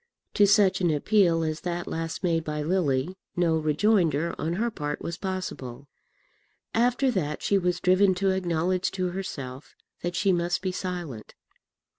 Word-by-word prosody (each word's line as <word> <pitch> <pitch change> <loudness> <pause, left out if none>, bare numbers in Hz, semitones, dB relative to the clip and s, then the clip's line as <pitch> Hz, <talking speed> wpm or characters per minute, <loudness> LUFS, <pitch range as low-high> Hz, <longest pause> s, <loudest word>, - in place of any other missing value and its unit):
To 205 - +5
such 195 -2 +4
an 175 - +3
appeal 165 +1 +3
as 155 0 -2
that 175 -1 -3
last 165 +3 -4
made 165 -2 +1
by 150 -1 -3
Lily 165 0 0 0.2
no 170 -2 +2
rejoinder 160 0 +2
on 160 +2 -1
her 230 +6 -1
part 150 -6 -4
was 170 - -3
possible. 170 -9 -5 0.9
After 245 +3 +2
that 150 -9 -2
she 200 - +3
was 180 -1 0
driven 185 +1 +4
to 195 +1 +1
acknowledge 180 0 0
to 185 -1 -1
herself 145 -8 -6 0.3
that 175 0 -3
she 195 -1 +2
must 175 +1 0
be 185 - 0
silent. 175 - -5
175 Hz, 155 wpm, -26 LUFS, 160-190 Hz, 0.9 s, To